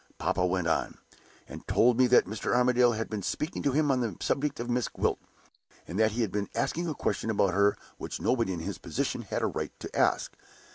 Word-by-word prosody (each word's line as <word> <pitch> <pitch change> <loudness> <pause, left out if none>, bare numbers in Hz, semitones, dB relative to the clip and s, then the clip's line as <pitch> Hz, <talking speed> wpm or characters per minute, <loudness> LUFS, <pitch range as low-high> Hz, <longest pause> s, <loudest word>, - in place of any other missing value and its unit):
Papa 90 - 0
went 90 -1 0
on, 80 - 0 0.5
and - - -10
told 120 +1 +4
me 130 +1 +4
that 125 - +5
Mr. 110 +4 -2
Armadale 125 -1 +4
had 115 +1 -3
been 110 -2 -4
speaking 150 - -3
to 140 - +1
him 145 +1 +2
on 130 -1 +1
the 110 -7 -3
subject 145 0 -1
of 120 - -3
Miss 120 -1 0
Gwilt, - - -1 0.7
and 90 - -4
that 110 -1 +3
he 120 - -1
had 105 - -2
been 100 +1 -2
asking 170 +9 -1
a 155 - -2
question 115 - -2
about 100 -4 +2
her 100 +2 +3 0.2
which - - -5
nobody 115 -6 +1
in 85 -3 -4
his - - -5
position - - -2
had - - -3
a - - +3
right - - -3
to - - -8
ask. - - +1
115 Hz, 225 wpm, -29 LUFS, 100-125 Hz, 0.7 s, that